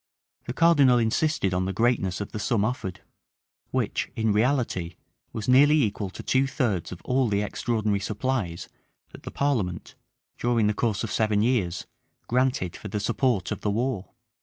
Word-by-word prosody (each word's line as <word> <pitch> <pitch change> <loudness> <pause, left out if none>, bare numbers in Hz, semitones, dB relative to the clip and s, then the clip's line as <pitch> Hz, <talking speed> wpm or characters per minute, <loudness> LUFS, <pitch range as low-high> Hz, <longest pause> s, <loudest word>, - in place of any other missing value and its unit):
The 120 - -3
cardinal 145 -5 +5
insisted 115 -2 +1
on 90 0 0
the 95 - -2
greatness 110 -4 +1
of 100 - -5
the 110 - -5
sum 105 -1 +1
offered, 95 -6 -4 0.7
which, - - -1
in 110 -2 +1
reality, 110 -7 0 0.4
was 110 -1 -5
nearly 145 +3 +6
equal 105 -2 -2
to - - -9
two 135 +1 +2
thirds 120 - -1
of 90 - -9
all 130 0 +2
the 100 0 +1
extraordinary 105 -1 -1
supplies 105 -4 -2 0.4
that - - -12
the - - -7
parliament, 115 -12 -1 0.5
during 120 -2 +2
the 105 - +2
course 110 -1 -1
of 110 - -4
seven 110 -2 +2
years, 105 -8 0 0.4
granted 125 -7 0
for - - -8
the 105 +1 -3
support 120 -2 0
of - - -4
the 105 - 0
war. 115 -1 -2
110 Hz, 165 wpm, -26 LUFS, 100-130 Hz, 0.7 s, nearly